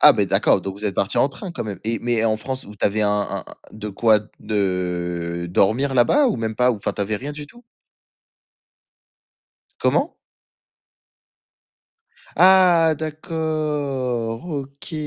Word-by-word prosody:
ah, -, -, +9 dB
beh, -, -, +1 dB
d'accord, -, -, +3 dB
donc 95 Hz, -, -5 dB
vous 100 Hz, +2 st, -8 dB
êtes 100 Hz, -3 st, -1 dB
partis 100 Hz, +2 st, -1 dB
en 140 Hz, -, +4 dB
train 185 Hz, +7 st, -8 dB
quand 170 Hz, -, -5 dB
même. 100 Hz, -4 st, -6 dB
Et 115 Hz, +1 st, -1 dB
mais 120 Hz, -2 st, 0 dB
en 110 Hz, -1 st, +2 dB
France, 130 Hz, +4 st, -5 dB
vous 105 Hz, -, -11 dB
tu -, -, -2 dB
avais 105 Hz, +2 st, +1 dB
un 105 Hz, -, +2 dB
un 105 Hz, 0 st, -2 dB, 0.3 s
de 105 Hz, 0 st, -6 dB
quoi 110 Hz, +1 st, +3 dB, 0.2 s
de 90 Hz, -4 st, -2 dB
dormir 120 Hz, +10 st, +2 dB
là-bas 270 Hz, -, +4 dB
ou -, -, -1 dB
même 110 Hz, -1 st, -3 dB
pas, 125 Hz, +3 st, +3 dB
ou 120 Hz, -, -1 dB
enfin 100 Hz, -, -3 dB
tu -, -, -6 dB
avais 105 Hz, +2 st, -1 dB
rien 140 Hz, +7 st, -6 dB
du 145 Hz, 0 st, -8 dB
tout? 240 Hz, +11 st, -17 dB, 2.2 s
Comment? -, -, +1 dB, 2.3 s
Ah 180 Hz, -4 st, +6 dB
d'accord, 150 Hz, -, -2 dB
OK. 140 Hz, -1 st, -7 dB
115 Hz, 155 wpm, -22 LUFS, 105-150 Hz, 2.3 s, ah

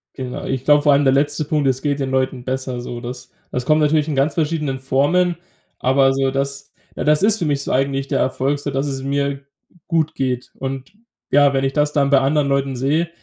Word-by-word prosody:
Genau. 130 Hz, -2 st, -6 dB
Ich 130 Hz, -1 st, -3 dB
glaube, 145 Hz, 0 st, +5 dB
vor 145 Hz, -2 st, +5 dB
allem 140 Hz, -, +3 dB
der 135 Hz, -1 st, +4 dB
letzte 145 Hz, +2 st, +1 dB
Punkt, 150 Hz, -2 st, 0 dB
es 130 Hz, 0 st, 0 dB
geht 145 Hz, -1 st, -1 dB
den 135 Hz, -, -2 dB
Leuten 130 Hz, -1 st, -1 dB
besser 130 Hz, -1 st, -3 dB
so. 120 Hz, -1 st, -6 dB
Das 125 Hz, 0 st, -8 dB, 0.2 s
das 125 Hz, 0 st, -3 dB
kommt 155 Hz, +2 st, +3 dB
natürlich 150 Hz, 0 st, +2 dB
in 150 Hz, -, -2 dB
ganz 140 Hz, +2 st, +1 dB
verschiedenen 150 Hz, -4 st, -1 dB
Formen, 155 Hz, +7 st, +1 dB, 0.4 s
aber 135 Hz, +1 st, +3 dB
so 135 Hz, 0 st, 0 dB
das 140 Hz, 0 st, -3 dB, 0.2 s
ja, -, -, -3 dB
das 150 Hz, +4 st, +3 dB
ist 220 Hz, +1 st, +3 dB
für 170 Hz, -, -1 dB
mich 140 Hz, -2 st, 0 dB
so -, -, -3 dB
eigentlich 135 Hz, +1 st, 0 dB
der -, -, 0 dB
Erfolg 135 Hz, +2 st, 0 dB
so, 145 Hz, 0 st, -4 dB
dass 135 Hz, +2 st, -1 dB
es 135 Hz, -1 st, -4 dB
mir 140 Hz, 0 st, -1 dB, 0.5 s
gut 160 Hz, -3 st, 0 dB
geht. 125 Hz, -2 st, -2 dB
Und 135 Hz, +6 st, -6 dB, 0.4 s
ja, 145 Hz, 0 st, +5 dB
wenn 135 Hz, 0 st, 0 dB
ich 135 Hz, 0 st, 0 dB
das 150 Hz, 0 st, +1 dB
dann 140 Hz, -2 st, +2 dB
bei 140 Hz, -1 st, +5 dB
anderen 140 Hz, +2 st, +1 dB
Leuten 140 Hz, -1 st, 0 dB
sehe, 150 Hz, +7 st, 0 dB
140 Hz, 225 wpm, -20 LUFS, 135-150 Hz, 0.5 s, glaube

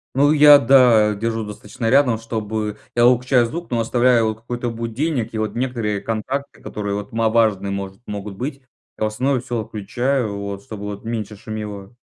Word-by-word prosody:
Ну 145 Hz, +2 st, +4 dB
я, 145 Hz, -1 st, +8 dB
да, 115 Hz, -5 st, +5 dB
держу 115 Hz, +1 st, -2 dB
достаточно 105 Hz, +2 st, -5 dB
рядом, 130 Hz, -3 st, +4 dB
чтобы 110 Hz, -1 st, -4 dB, 0.2 s
я 120 Hz, 0 st, +4 dB
выключаю 125 Hz, 0 st, +4 dB
звук, 170 Hz, +8 st, -6 dB
но 120 Hz, -, +1 dB
оставляю 115 Hz, -1 st, +2 dB
какой-то 120 Hz, +2 st, -4 dB
будильник, 115 Hz, +2 st, -2 dB
и -, -, -3 dB
вот 110 Hz, 0 st, -2 dB
некоторые 115 Hz, -5 st, -2 dB
контакты 130 Hz, +6 st, -4 dB
которые 100 Hz, -1 st, -4 dB
вот 105 Hz, +4 st, -6 dB
ма 115 Hz, 0 st, +2 dB
важные 110 Hz, -4 st, +2 dB
может, 100 Hz, +1 st, -5 dB
могут 105 Hz, -1 st, -6 dB
быть. 135 Hz, +6 st, -5 dB, 0.4 s
А -, -, -2 dB
в -, -, +2 dB
основном 130 Hz, +5 st, 0 dB
всё 120 Hz, -2 st, -3 dB
отключаю 110 Hz, +2 st, -2 dB
вот, 100 Hz, 0 st, -6 dB
чтобы 105 Hz, -1 st, -8 dB
вот 105 Hz, +1 st, -7 dB
меньше 110 Hz, -2 st, -4 dB
шумело. 105 Hz, -1 st, -7 dB
115 Hz, 175 wpm, -21 LUFS, 105-125 Hz, 0.4 s, я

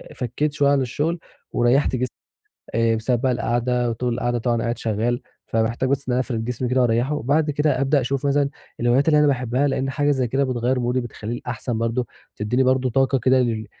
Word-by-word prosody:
فكِّيت 145 Hz, +4 st, -2 dB
شوية 145 Hz, -1 st, +2 dB
عن 140 Hz, -1 st, +3 dB
الشغل 150 Hz, +7 st, -1 dB, 0.3 s
وريَّحت 125 Hz, +3 st, +2 dB
جسمي. 125 Hz, +1 st, 0 dB, 0.7 s
آآ، 115 Hz, 0 st, +3 dB
بسبَب 115 Hz, +2 st, 0 dB
بقى 130 Hz, 0 st, +2 dB
القعدة 120 Hz, 0 st, 0 dB
وطول 120 Hz, +1 st, -2 dB
القعدة، 120 Hz, 0 st, -1 dB
طبعًا 120 Hz, 0 st, 0 dB
قاعد 120 Hz, +1 st, -2 dB
شغَّال، 115 Hz, +2 st, -1 dB, 0.3 s
فباحتاج 115 Hz, +3 st, 0 dB
بس 140 Hz, 0 st, -1 dB
أنا 125 Hz, 0 st, +2 dB
أفرد 120 Hz, -3 st, -2 dB
جسمي 125 Hz, +1 st, -2 dB
كده 130 Hz, +1 st, +2 dB
وأريِّحه. 120 Hz, +4 st, +2 dB
وبعد 150 Hz, +4 st, +1 dB
كده 150 Hz, -1 st, +1 dB
أبدأ 140 Hz, +1 st, +3 dB
أشوف 135 Hz, +2 st, -2 dB
مثلًا 140 Hz, 0 st, +2 dB, 0.3 s
الهوايات 120 Hz, +5 st, +3 dB
اللي 150 Hz, -1 st, +5 dB
أنا 150 Hz, -, +5 dB
باحبها، 130 Hz, 0 st, +1 dB
لأن 135 Hz, 0 st, -1 dB
حاجة 145 Hz, +2 st, +1 dB
زي 130 Hz, -4 st, +1 dB
كده 135 Hz, +4 st, +1 dB
بتغيِّر 125 Hz, 0 st, 0 dB
مودي، 125 Hz, +1 st, 0 dB
بتخلِّيني 120 Hz, -1 st, -5 dB
الأحسَن، 125 Hz, -1 st, -4 dB
برضه 115 Hz, +1 st, -1 dB, 0.3 s
تدِّيني 120 Hz, +5 st, +1 dB
برضه 130 Hz, 0 st, +2 dB
طاقة 135 Hz, +2 st, +2 dB
كده 130 Hz, +2 st, +3 dB
لل 115 Hz, -3 st, -1 dB
125 Hz, 195 wpm, -22 LUFS, 120-135 Hz, 0.7 s, اللي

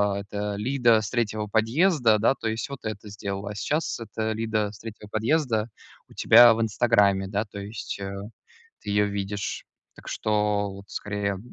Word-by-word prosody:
а, -, -, -2 dB
эта 100 Hz, +1 st, -4 dB
Лида 120 Hz, -1 st, +3 dB
с 105 Hz, -, -4 dB
3 110 Hz, -3 st, -1 dB
подъезда, 115 Hz, -, +3 dB
да, 115 Hz, -, +4 dB
то 110 Hz, -, -3 dB
есть 115 Hz, +8 st, -3 dB
вот 140 Hz, -, -8 dB
это 105 Hz, 0 st, -5 dB
сделала. 100 Hz, 0 st, -5 dB
А -, -, -7 dB
сейчас 150 Hz, +6 st, -1 dB
эта 110 Hz, 0 st, -3 dB
Лида 110 Hz, -2 st, -1 dB
с 100 Hz, -, -13 dB
3 110 Hz, -2 st, -9 dB
подъезда 115 Hz, -1 st, 0 dB, 0.4 s
у -, -, -16 dB
тебя 120 Hz, +1 st, +7 dB
в 115 Hz, -, -2 dB
инстаграме, 105 Hz, -3 st, +2 dB
да. 105 Hz, +2 st, -1 dB
То 100 Hz, -1 st, -9 dB
есть, 100 Hz, 0 st, -6 dB
э, 95 Hz, 0 st, -4 dB, 0.7 s
ты -, -, -6 dB
её 105 Hz, 0 st, +3 dB
видишь. 100 Hz, -1 st, -4 dB, 0.3 s
Так -, -, -12 dB
что, 105 Hz, -1 st, 0 dB
вот 100 Hz, 0 st, -11 dB
скорее 100 Hz, -2 st, -3 dB
105 Hz, 175 wpm, -25 LUFS, 100-115 Hz, 0.7 s, тебя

